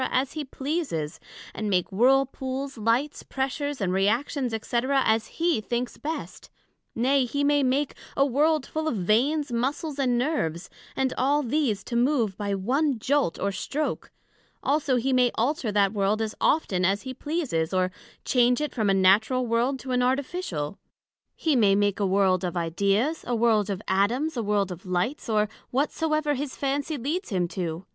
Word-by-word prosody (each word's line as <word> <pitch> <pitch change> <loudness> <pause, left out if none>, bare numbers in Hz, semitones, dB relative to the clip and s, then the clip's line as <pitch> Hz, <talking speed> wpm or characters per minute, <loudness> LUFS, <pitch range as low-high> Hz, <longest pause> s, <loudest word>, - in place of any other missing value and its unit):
as 260 +1 0
he 310 - -3
pleases, 270 - -3 0.3
and 215 -1 -3
make 180 -1 +1
Whirl 260 +7 +4
pools, 270 +1 -5
Lights, 235 +6 0
Pressures, 275 +1 -3
and 185 -3 0
Reactions, 235 +7 0
&c. 225 +2 -2
as 230 -5 +2
he 335 -8 0
thinks 240 +3 -3
best; 315 +2 -6 0.5
nay, 260 +3 +2
he 285 +4 -1
may 290 0 +3
make 275 +2 +1 0.2
a 275 - +5
World 295 +2 +2
full 315 0 -3
of 310 - 0
Veins, 250 - +1
Muscles, 275 +5 -2
and 250 -3 +2
Nerves, 240 - -1 0.2
and 265 -1 0
all 285 +3 +2
these 240 -6 0
to 240 - -5
move 240 -5 +2
by 200 0 -2
one 260 +8 +1
jolt 275 - 0
or 200 - 0
stroke: 285 +10 -3 0.5
also 285 -2 +1
he 255 +2 +1
may 250 -1 +4
alter 240 -1 0
that 200 -1 +2
World 205 +1 +1
as 220 -1 -2
often 195 - +2
as 195 +2 +1
he 260 - -5
pleases, 265 - -2
or 185 -1 +1 0.3
change 245 0 +3
it 300 0 -2
from 215 -5 0
a 195 - +4
Natural 215 +7 +4
World, 240 +4 +1
to 260 - -6
an 250 0 +2
Artificial; 250 - -2 0.6
he 315 -3 +1
may 205 -5 +4
make 205 0 +1
a 200 - +2
World 190 -1 +2
of 180 0 -2
Ideas, 200 - 0
a 240 - 0
World 220 -3 +2
of 195 -2 -3
Atoms, 240 +11 +1
a 240 - -1
World 205 -3 0
of 180 0 -8
Lights, 185 +10 -2
or 215 -1 +2 0.2
whatsoever 305 +2 0
his 280 0 -4
Fancy 285 +2 -2
leads 310 - -3
him 180 -5 0
to. 170 0 -4
245 Hz, 175 wpm, -26 LUFS, 200-285 Hz, 0.6 s, a